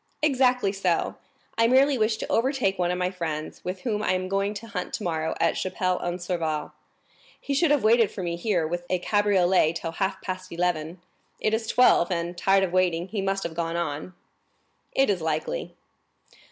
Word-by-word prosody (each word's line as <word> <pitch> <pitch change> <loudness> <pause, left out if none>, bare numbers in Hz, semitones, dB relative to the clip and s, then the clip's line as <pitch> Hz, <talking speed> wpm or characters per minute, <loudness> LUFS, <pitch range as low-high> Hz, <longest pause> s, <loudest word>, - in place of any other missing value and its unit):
"Exactly 250 -7 +3
so; 190 -4 0 0.5
I 230 - +5
merely 270 +3 +4
wish 220 -2 +1
to - - -5
overtake 240 -6 +1
one 175 -1 +1
of 180 - -1
my 180 0 0
friends, 160 -4 -5
with 180 +1 -4
whom 215 -4 -1
I 185 - +1
am 185 0 -1
going 195 +2 0
to 210 +3 -7
hunt 200 -5 -5
tomorrow 160 -2 -2
at 165 - +2
Chapelle 185 -1 -1
en 175 0 -2
Serval. 170 -4 -3 0.7
He 280 - -3
should 315 +3 +3
have 290 -4 +3
waited 225 -1 +5
for 190 - -6
me 170 -1 -2
here 175 -2 0
with 175 +2 -3
a 185 - +2
cabriolet 190 -4 +3
till 165 -1 -4
half 190 +3 -2
past 185 -1 -5
eleven; 170 -1 -1 0.4
it 215 - 0
is 220 0 -1
twelve, 235 -9 +4
and, 170 -1 -2
tired 195 +2 +3
of 180 -2 -2
waiting, 180 -1 +1
he 210 -1 -2
must 195 0 -1
have 170 - -4
gone 165 0 -2
on." 170 +1 -3 0.8
"It 270 - +3
is 185 -4 -2
likely." 160 - -3
185 Hz, 190 wpm, -26 LUFS, 170-215 Hz, 0.8 s, I